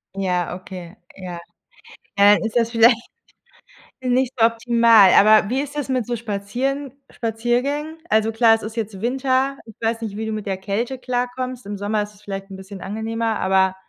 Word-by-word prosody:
Ja, 180 Hz, -3 st, -1 dB
okay, 185 Hz, -1 st, -10 dB, 0.2 s
ja. 180 Hz, -3 st, -7 dB, 0.8 s
Äh, 205 Hz, +1 st, +6 dB
ist 220 Hz, -, -4 dB
das 230 Hz, -1 st, +2 dB
vielleicht 235 Hz, +1 st, +5 dB, 1.0 s
nicht 255 Hz, -1 st, 0 dB
optimal. 230 Hz, -3 st, +5 dB
Aber 215 Hz, 0 st, +6 dB
wie 260 Hz, +3 st, 0 dB
ist 285 Hz, 0 st, -5 dB
das 290 Hz, -2 st, -3 dB
mit 255 Hz, -3 st, 0 dB
so 240 Hz, -, -1 dB
Spazieren 240 Hz, +6 st, -3 dB, 0.2 s
Spaziergängen? 250 Hz, +7 st, -2 dB
Also, 220 Hz, +1 st, +2 dB
klar, 225 Hz, 0 st, +5 dB
es 225 Hz, -, -7 dB
ist 220 Hz, +2 st, -7 dB
jetzt 210 Hz, -3 st, -4 dB
Winter. 265 Hz, +2 st, 0 dB
Ich 220 Hz, -, -14 dB
weiß 225 Hz, 0 st, 0 dB
nicht, 210 Hz, -3 st, -5 dB
wie 220 Hz, -, -4 dB
du 220 Hz, -, -3 dB
mit 215 Hz, -1 st, -4 dB
der 195 Hz, -, -1 dB
Kälte 210 Hz, +7 st, -3 dB
klarkommst. 250 Hz, -1 st, -3 dB
Im 205 Hz, 0 st, -5 dB
Sommer 210 Hz, +1 st, -1 dB
ist 205 Hz, 0 st, -10 dB
es 200 Hz, -, -21 dB
vielleicht 195 Hz, -1 st, -7 dB
'n 195 Hz, -, -8 dB
bisschen 190 Hz, +1 st, -10 dB
angenehmer, 220 Hz, +2 st, -3 dB
aber 190 Hz, 0 st, +2 dB
225 Hz, 175 wpm, -21 LUFS, 200-245 Hz, 1.0 s, Äh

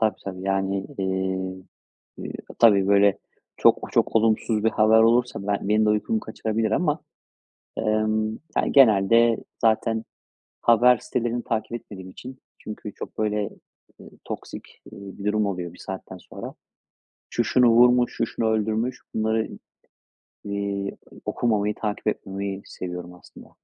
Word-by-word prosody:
Tabii, 110 Hz, -3 st, +2 dB
tabii 95 Hz, -1 st, -6 dB
yani, 95 Hz, 0 st, 0 dB
iii. 95 Hz, -, -6 dB
Eee, 95 Hz, 0 st, -1 dB, 0.8 s
ııı, -, -, -6 dB, 0.3 s
tabii 100 Hz, -5 st, +6 dB
böyle 100 Hz, 0 st, +4 dB, 0.4 s
çok, -, -, +3 dB
çok -, -, +2 dB
olumsuz 110 Hz, -1 st, +2 dB
bir 110 Hz, -, +4 dB
haber 110 Hz, +1 st, +4 dB
olursa 120 Hz, +1 st, +3 dB
ben 100 Hz, -1 st, -1 dB
benim 110 Hz, +1 st, +3 dB
de -, -, +4 dB
uykumu 215 Hz, -, 0 dB
kaçırabilir 110 Hz, -, -2 dB
ama, 155 Hz, -3 st, +1 dB, 0.8 s
emm, 110 Hz, 0 st, +1 dB, 0.3 s
ya -, -, +2 dB
genelde 115 Hz, -2 st, +5 dB, 0.2 s
zaten 110 Hz, 0 st, +1 dB, 0.6 s
haber 120 Hz, +1 st, +6 dB
sitelerini 120 Hz, 0 st, -2 dB
takip 110 Hz, 0 st, -2 dB
etmediğim 95 Hz, -5 st, -8 dB
için 130 Hz, +6 st, -10 dB, 0.2 s
çünkü 105 Hz, -1 st, -8 dB
çok -, -, -9 dB
böyle, 105 Hz, -1 st, 0 dB, 0.5 s
eee, -, -, -13 dB
toksik, -, -, -8 dB
eee, -, -, -10 dB, 0.2 s
bir 100 Hz, -, -8 dB
durum 105 Hz, 0 st, +1 dB
oluyor 90 Hz, -3 st, -4 dB
bir -, -, -16 dB
saatten 95 Hz, 0 st, -8 dB
sonra. -, -, -9 dB, 0.8 s
Şu 120 Hz, -, 0 dB
şunu 120 Hz, +1 st, +4 dB
vurmuş. 125 Hz, +1 st, +5 dB
Şu -, -, 0 dB
şunu 115 Hz, 0 st, -2 dB
öldürmüş. 110 Hz, +3 st, -1 dB
Bunları 110 Hz, 0 st, 0 dB, 1.0 s
i -, -, -6 dB
eee, 100 Hz, -1 st, -3 dB, 0.3 s
okumamayı, 105 Hz, -3 st, 0 dB
takip 105 Hz, -1 st, -4 dB
etmemeyi 100 Hz, -1 st, -3 dB
seviyorum 90 Hz, -1 st, -7 dB
aslında. 90 Hz, -, -15 dB
110 Hz, 140 wpm, -24 LUFS, 100-115 Hz, 1.0 s, tabii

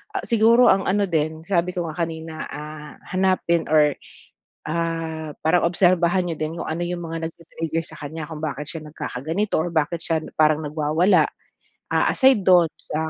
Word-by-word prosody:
ah -, -, -2 dB
siguro 230 Hz, +1 st, +5 dB
ang 195 Hz, -, +2 dB
ano 200 Hz, +1 st, +2 dB
din 160 Hz, -1 st, -1 dB
sabi 180 Hz, -2 st, +1 dB
ko 175 Hz, -2 st, -2 dB
nga 155 Hz, -, -8 dB
kanina, 160 Hz, -1 st, -7 dB
ah, 150 Hz, 0 st, -8 dB, 0.2 s
hanapin 185 Hz, -3 st, +1 dB
or 150 Hz, -2 st, +4 dB, 0.7 s
ah, 165 Hz, -1 st, -3 dB
parang 170 Hz, +3 st, +3 dB
obserbahan 180 Hz, 0 st, +2 dB
niyo 165 Hz, -, -3 dB
din 155 Hz, +1 st, -2 dB
kung -, -, -4 dB
ano 160 Hz, +2 st, -2 dB
yung 175 Hz, 0 st, -4 dB
mga 165 Hz, 0 st, -3 dB
nag-ti-trigger 165 Hz, -1 st, -5 dB
sa 160 Hz, -, -11 dB
kanya 150 Hz, +1 st, -6 dB
kung 155 Hz, -2 st, -8 dB
bakit 150 Hz, -1 st, -4 dB
siya 160 Hz, -2 st, -7 dB
nagkakaganito 155 Hz, +6 st, -3 dB
or 175 Hz, +2 st, -2 dB
bakit 160 Hz, +1 st, 0 dB
siya 165 Hz, -1 st, 0 dB, 0.2 s
parang 155 Hz, 0 st, +4 dB
nagwawala. 155 Hz, +5 st, +2 dB, 0.7 s
Ah, -, -, +3 dB
aside 265 Hz, -5 st, +4 dB
do'n 175 Hz, -3 st, +6 dB
sa 160 Hz, +1 st, -4 dB
165 Hz, 170 wpm, -23 LUFS, 155-175 Hz, 0.7 s, do'n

